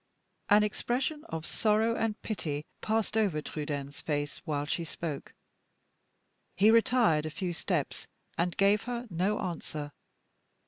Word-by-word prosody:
An 210 +1 +7
expression 255 +8 -1
of 160 0 -5
sorrow 220 +1 +2
and 225 -2 -1
pity 155 -8 -3 0.2
passed 220 0 0
over 200 -8 +2
Trudaine's 145 -2 -4
face 145 -1 -2
while 145 -3 -1
she 170 +3 -1
spoke. 160 -3 -5 1.2
He 205 +4 +6
retired 225 -9 +4
a - - -2
few 175 +2 -3
steps, - - -2 0.3
and 170 0 0
gave 200 +2 +4
her 245 0 -3
no 185 +5 +1
answer. 155 -4 -4
180 Hz, 130 wpm, -30 LUFS, 150-220 Hz, 1.2 s, An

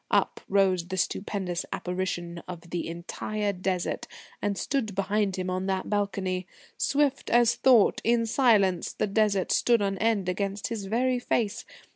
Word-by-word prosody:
Up - - +1
rose 190 -3 +2
the 190 +1 -4
stupendous 185 -1 -2
apparition 175 -2 -3
of 175 -1 -9
the 175 - -2
entire 200 +5 -3
Desert 185 -1 -2 0.3
and 205 -1 -1
stood 235 -8 -1
behind 200 0 0
him 185 -1 -3
on 185 +1 -2
that 190 +1 -2
balcony. 190 -3 -1 0.3
Swift 280 -1 +1
as 240 0 +5
thought, 240 -6 +4
in 235 0 +2
silence, 215 -7 +3
the - - 0
Desert 205 -2 +1
stood 235 -1 +4
on 195 -2 -1
end 220 -4 +1
against 195 +2 -2
his 220 -4 -4
very 250 +5 +1
face. 225 -3 -1
200 Hz, 150 wpm, -27 LUFS, 185-220 Hz, 0.3 s, as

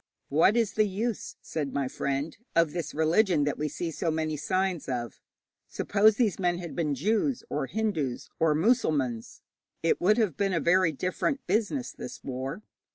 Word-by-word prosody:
'What 165 +10 +4
is 225 -3 +1
the 215 -1 +3
use,' 215 +3 -3
said 145 -4 -3
my 140 -2 0
friend, 140 +4 -2 0.2
'of 165 -2 +3
this 170 -3 -4
religion 160 +1 +3
that 145 0 -1
we 150 - 0
see 165 +3 -4
so 165 - -2
many 155 -1 -1
signs 185 +2 -1
of? 120 -3 -4 0.5
Suppose 215 +1 +3
these 220 -6 +1
men 175 -2 +1
had 175 -2 -7
been 150 -4 0
Jews 220 - 0
or 145 -2 -1
Hindus 170 - -2
or 160 -2 +3
Mussulmans, 150 - +1 0.4
it 165 - +2
would 210 +5 +4
have 210 - +1
been 195 -1 0
a 170 - +2
very 175 +1 +3
different 185 - -2
business, 230 +4 0
this - - -9
war. 135 +8 -5
170 Hz, 170 wpm, -28 LUFS, 145-205 Hz, 0.5 s, What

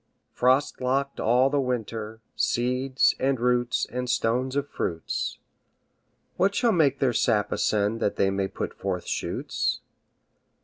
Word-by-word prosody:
Frost 130 +3 +2
locked 135 +2 -1
all 125 +4 +3
the 145 - +2
winter, 110 -3 -3
Seeds, 125 +2 +1
and 135 -1 +1
roots, 120 0 +1
and 125 0 -4
stones 125 +4 0
of 140 0 0
fruits, 80 - -3 1.0
What 195 +2 +2
shall 240 -2 +3
make 145 -7 +3
their 130 -3 +1
sap 105 -2 +1
ascend 105 +1 +1
That 105 - 0
they 95 - +2
may 95 0 -1
put - - -5
forth - - -3
shoots? - - -2
125 Hz, 135 wpm, -26 LUFS, 115-135 Hz, 1.0 s, all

